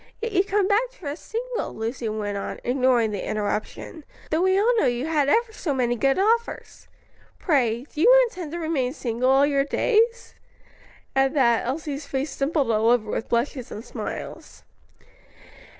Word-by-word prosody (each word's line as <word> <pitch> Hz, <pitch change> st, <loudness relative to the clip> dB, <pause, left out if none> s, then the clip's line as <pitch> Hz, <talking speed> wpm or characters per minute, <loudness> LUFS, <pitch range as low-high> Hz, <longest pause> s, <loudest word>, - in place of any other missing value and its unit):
"Yet 460 Hz, 0 st, -3 dB
you've 390 Hz, 0 st, +2 dB
come 400 Hz, -1 st, +1 dB
back 435 Hz, +5 st, +2 dB
to 365 Hz, -12 st, -7 dB
us 290 Hz, -, -6 dB
single," -, -, -4 dB
Lucy 225 Hz, +1 st, -3 dB
went 210 Hz, -1 st, -3 dB
on, 200 Hz, -, -5 dB
ignoring 245 Hz, -3 st, +2 dB
the 205 Hz, -, -4 dB
interruption, 215 Hz, -, -4 dB, 0.3 s
"though 315 Hz, +2 st, +2 dB
we 375 Hz, +1 st, +3 dB
all 450 Hz, +5 st, +3 dB
know -, -, +3 dB
you 245 Hz, +2 st, -1 dB
had 300 Hz, -3 st, +1 dB
ever 455 Hz, +5 st, +2 dB
so 305 Hz, -9 st, -3 dB
many 240 Hz, -2 st, +1 dB
good 270 Hz, +3 st, +1 dB
offers. 455 Hz, +4 st, -1 dB, 0.5 s
Pray, 245 Hz, -, +1 dB
do 310 Hz, -, -3 dB
you -, -, +7 dB
intend 355 Hz, -8 st, -8 dB
to -, -, -3 dB
remain 305 Hz, -7 st, -1 dB
single 250 Hz, -2 st, -1 dB
all 270 Hz, +1 st, +5 dB
your 280 Hz, -1 st, +2 dB
days?" 460 Hz, -, +1 dB, 0.8 s
At 270 Hz, +2 st, +2 dB
that, 235 Hz, -4 st, +3 dB
Elsie's 285 Hz, +1 st, -4 dB
face 275 Hz, +2 st, -3 dB
dimpled 275 Hz, -3 st, 0 dB
all 220 Hz, +1 st, +2 dB
over 230 Hz, -3 st, +2 dB
with -, -, -3 dB
blushes 240 Hz, +1 st, -1 dB
and 220 Hz, -, -7 dB
smiles. -, -, -7 dB
280 Hz, 170 wpm, -24 LUFS, 240-375 Hz, 0.8 s, you